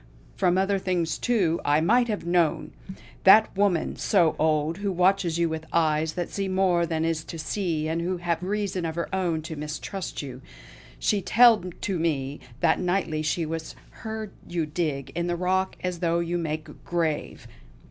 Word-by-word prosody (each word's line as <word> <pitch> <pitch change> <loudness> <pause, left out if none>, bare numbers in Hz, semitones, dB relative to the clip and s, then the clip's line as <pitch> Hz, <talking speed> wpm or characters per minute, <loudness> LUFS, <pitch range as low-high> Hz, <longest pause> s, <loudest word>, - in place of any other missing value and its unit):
From 180 -2 +2
other 195 +1 +2
things, 175 -5 -1
too, 190 -9 +1
I 145 +1 +3
might 240 +9 +3
have 210 -6 -3
known! 170 -3 +1 0.5
That 215 +3 +7
woman, 195 -4 +1
so 175 -6 +3
old, 155 +2 +1
who 200 -1 -1
watches 180 -2 +2
you 170 0 +2
with 160 0 -5
eyes 155 -1 +1
that 175 -2 -4
see 195 -1 -2
more 185 -2 +2
than 160 -1 -1
is 165 -1 -1
to 165 - -7
see, 160 -1 -2
and 165 +1 -1
who 180 +2 -1
have 170 -1 -1
reason 195 -1 -2
of 160 -1 -3
her 170 +2 -4
own 175 -4 0
to 160 0 -6
mistrust 150 +4 -5
you, 130 -2 -8 0.6
she 200 - +1
telled 220 -4 +4
to 190 -4 -1
me 145 -4 -1 0.2
that 165 - +3
nightly 180 -4 0
she 155 +2 0
has 160 0 -5 0.3
heard 220 -2 -5 0.2
you 170 -2 -1
dig 150 -3 -3
in 170 0 -2
the 175 - 0
rock 185 +2 0
as 180 -2 -2
though 170 -1 +1
you 170 +1 -1
make 155 -1 -5
grave. 165 -3 -2
170 Hz, 180 wpm, -26 LUFS, 160-190 Hz, 0.6 s, That